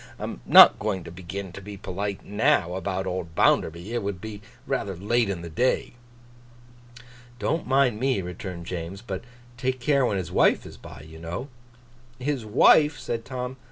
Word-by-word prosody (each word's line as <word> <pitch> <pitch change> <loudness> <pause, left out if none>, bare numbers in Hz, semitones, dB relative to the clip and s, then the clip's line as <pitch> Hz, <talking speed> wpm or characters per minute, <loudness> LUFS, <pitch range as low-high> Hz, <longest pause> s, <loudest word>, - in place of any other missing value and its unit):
I - - -8
am - - -5
not - - +9
going 100 -4 -2
to - - -9
begin 95 +2 -7
to 95 - -9
be 100 +1 -9
polite 100 +1 -4
now, 105 - +2
about 95 0 -3
old 90 -3 -4
Bounderby. 85 +9 +2
It 120 - 0
would 100 -2 -4
be 105 0 -8 0.2
rather 100 -8 -2
late 110 +5 +1
in 90 -3 -4
the 85 - -6
day.' 125 +11 0 1.4
'Don't 160 +6 -1
mind 130 -4 +3
me,' 130 -6 +1
returned 90 0 -7
James; 90 +4 -6
'but 95 -4 -5 0.3
take 130 +1 -1
care 140 +2 +2
when 105 -5 +1
his 90 -4 -4
wife - - +3
is - - -10
by, - - -12
you 80 +1 -12
know.' 85 - -5 0.7
'His 130 -1 -2
wife?' 145 +7 +5
said 115 -3 -4
Tom. 130 0 -5
100 Hz, 175 wpm, -25 LUFS, 90-125 Hz, 1.4 s, not